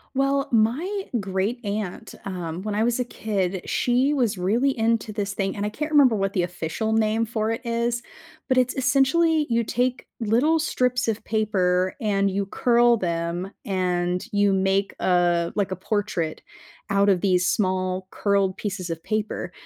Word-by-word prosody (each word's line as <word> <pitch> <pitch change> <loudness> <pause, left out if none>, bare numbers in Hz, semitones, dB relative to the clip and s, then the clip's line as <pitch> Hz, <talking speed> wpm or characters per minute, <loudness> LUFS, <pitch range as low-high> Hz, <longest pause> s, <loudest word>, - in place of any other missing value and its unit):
Well, 275 +1 +1
my 290 - +1 0.2
great 195 +5 -2
aunt, 200 -3 -4
um, 180 -2 -5
when 210 -1 -3
I 215 - +1
was 240 +1 +1
a - - +2
kid, 195 -6 -2
she 255 +4 +2
was 235 -7 0
really 235 +9 +1
into 225 -1 0
this 200 -1 -3
thing, 195 -1 -1
and 205 - -2
I - - -2
can't 305 +8 -4
remember 275 -6 +5
what 195 -1 -1
the 185 - +1
official 180 +5 -2
name 220 +1 +2
for 220 0 -1
it 225 - -3
is, 235 0 -1 0.5
but 260 - +2
it's 255 0 +3
essentially 280 +5 +3
you 230 0 +2
take 245 +3 -1
little 240 +9 +2
strips 250 -6 0
of 225 -1 -1
paper, 185 -4 +1
and 200 -2 +1
you 195 0 -2
curl 240 +2 +3
them, 170 0 -2
and 180 -2 -1
you 205 0 +3
make, 195 +1 +1
uh, 175 -2 +2
like, 200 -2 0
a - - -1
portrait 185 -5 -2 0.5
out 200 0 +3
of 190 -3 +3
these 180 -2 +2
small, 185 -1 0
curled 200 -2 +1
pieces 195 -4 -4
of 165 -1 -4
paper. 215 -1 -3
210 Hz, 170 wpm, -24 LUFS, 185-240 Hz, 0.5 s, remember